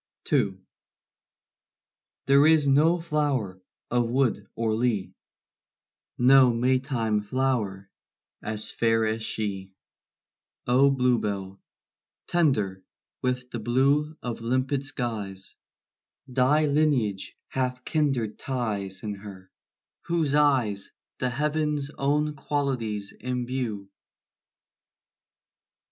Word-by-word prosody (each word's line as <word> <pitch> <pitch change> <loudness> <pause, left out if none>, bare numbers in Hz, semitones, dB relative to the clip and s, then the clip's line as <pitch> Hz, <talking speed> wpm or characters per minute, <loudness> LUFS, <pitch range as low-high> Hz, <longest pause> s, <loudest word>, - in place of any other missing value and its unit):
II. 95 -2 +2 1.7
There 140 +2 +6
is 155 -2 +4
no 155 +5 +4
flower 145 - -1 0.3
of 120 -1 +1
wood 120 -5 +1
or 115 -1 0
lea, 110 -4 0 1.0
No 130 0 +6
Maytime 120 -3 +1
flower, 105 -4 -1 0.5
as 110 0 -3
fair 115 -1 +2
as 110 +1 -1
she: 95 -4 -4 0.9
O 130 +3 +5
bluebell, 105 -7 0 0.6
tender 110 - +1 0.4
with 125 0 -2
the 120 - -4
blue 140 +7 +1
Of 120 -2 -4
limpid 130 +4 0
skies, 110 -8 -4 0.7
Thy 130 +4 +3
lineage 140 -10 0
hath 125 -1 -2
kindred 135 -9 0
ties 105 -7 -3
In 105 -1 -3
her, 95 -2 -11 0.5
whose 165 -4 0
eyes 130 -9 +2 0.3
The 125 - 0
heav'n's 150 +1 -1
own 150 +1 0
qualities 130 -8 -2
imbue. 125 -5 -3
125 Hz, 90 wpm, -26 LUFS, 105-140 Hz, 1.7 s, There